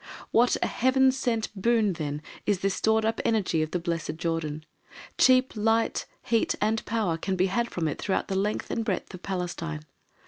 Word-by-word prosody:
What 240 Hz, +2 st, +4 dB
a -, -, +2 dB
Heaven 260 Hz, +1 st, +3 dB
sent 240 Hz, -4 st, -1 dB
boon 215 Hz, 0 st, +2 dB
then 150 Hz, -2 st, -4 dB, 0.2 s
is 200 Hz, -3 st, +1 dB
this 195 Hz, -1 st, +1 dB
stored 220 Hz, +2 st, +2 dB
up 225 Hz, -, 0 dB
energy 200 Hz, -8 st, +1 dB
of 155 Hz, -, -1 dB
the 180 Hz, -, -1 dB
blessed 170 Hz, -2 st, -3 dB
Jordan. 160 Hz, -2 st, -2 dB, 0.5 s
Cheap 255 Hz, 0 st, +5 dB
light, 225 Hz, +1 st, +1 dB, 0.2 s
heat, 230 Hz, -1 st, +1 dB
and 215 Hz, +1 st, +1 dB
power 210 Hz, -7 st, 0 dB
can 190 Hz, +3 st, -2 dB
be 185 Hz, 0 st, +2 dB
had 235 Hz, +5 st, 0 dB
from 165 Hz, -3 st, -2 dB
it 150 Hz, -, -3 dB
throughout 195 Hz, -, 0 dB
the -, -, -3 dB
length 200 Hz, +2 st, -1 dB
and 230 Hz, -, -1 dB
breadth 195 Hz, -3 st, -3 dB
of 185 Hz, -, -9 dB
Palestine. 170 Hz, -4 st, -4 dB
195 Hz, 185 wpm, -27 LUFS, 170-225 Hz, 0.5 s, Cheap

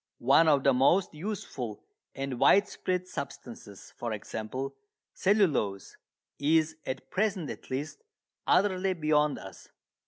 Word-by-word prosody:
One 140 Hz, +6 st, +4 dB
of 145 Hz, -3 st, +4 dB
the 140 Hz, -, +5 dB
most 165 Hz, +10 st, +3 dB
useful 150 Hz, -, -5 dB, 0.3 s
and 135 Hz, -2 st, -4 dB
widespread 185 Hz, -1 st, +2 dB
substances, 120 Hz, -, -8 dB
for 120 Hz, -2 st, -4 dB
example, 110 Hz, +5 st, -5 dB, 0.4 s
cellulose, 155 Hz, -, +1 dB, 0.4 s
is, 155 Hz, +2 st, +2 dB
at 130 Hz, +1 st, -5 dB
present 195 Hz, -6 st, 0 dB
at -, -, -11 dB
least, 145 Hz, -, -4 dB, 0.5 s
utterly 190 Hz, -1 st, +3 dB
beyond 150 Hz, -2 st, +2 dB
us. 95 Hz, -4 st, -11 dB
150 Hz, 115 wpm, -29 LUFS, 130-185 Hz, 0.5 s, the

